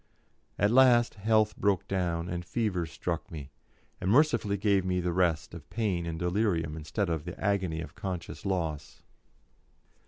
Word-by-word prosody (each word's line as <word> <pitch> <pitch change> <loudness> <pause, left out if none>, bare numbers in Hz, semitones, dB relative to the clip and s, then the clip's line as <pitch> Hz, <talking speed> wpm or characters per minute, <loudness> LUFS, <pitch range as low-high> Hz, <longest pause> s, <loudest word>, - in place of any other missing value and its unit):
At 100 +1 +3
last 120 -2 +5
health 110 +1 +2
broke 100 -3 +1
down, 85 -3 -1
and 90 0 -3
fever 90 -2 -1
struck 85 +1 -4
me, 75 -4 -8 0.5
and 95 - 0
mercifully 115 -5 +3
gave 100 -1 +2
me 90 0 0
the 90 -1 -1
rest 85 -4 +1
of 80 -3 -10
pain 95 -7 -1
and 80 -1 -3
delirium 90 -3 0
instead 80 +6 -2
of 80 -3 -2
the 90 +3 -8
agony 95 -6 0
of 80 - -8
conscious 85 -4 -5
loss. 85 -7 -3
90 Hz, 155 wpm, -29 LUFS, 85-100 Hz, 0.5 s, last